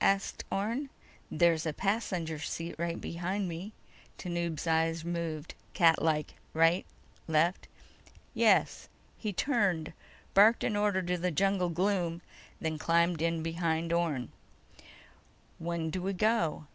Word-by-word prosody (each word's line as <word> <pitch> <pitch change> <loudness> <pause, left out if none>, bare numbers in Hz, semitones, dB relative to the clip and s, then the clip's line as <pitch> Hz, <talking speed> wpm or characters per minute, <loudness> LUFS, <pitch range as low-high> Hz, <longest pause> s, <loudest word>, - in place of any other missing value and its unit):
asked 195 0 +1
Orne. 230 +8 -1 0.4
"There's 165 0 +3
a 155 - -1
passenger 180 -5 -1
seat 165 +2 -4
right 170 0 -2
behind 185 +3 -3
me." 175 +5 -6 0.5
Tanub's 170 -3 -3
eyes 165 0 +1
moved 165 -2 -3 0.2
catlike: 160 -2 +3 0.2
right, 165 +2 +3 0.4
left. 160 +3 +1 0.7
"Yes." - - +3 0.3
He 215 - -2
turned, 195 - 0 0.4
barked 215 +4 +6
an 215 - 0
order 205 -2 +2
into 180 0 -1
the 180 +1 0
jungle 190 +1 +1
gloom, 175 -1 0 0.4
then 160 -1 -2
climbed 170 0 +2
in 165 -1 0
behind 165 0 -1
Orne. 155 -8 0 1.3
"When 165 -1 -2
do 185 - -3
we 195 +2 -1
go?" 180 -6 +1
170 Hz, 120 wpm, -31 LUFS, 165-190 Hz, 1.3 s, barked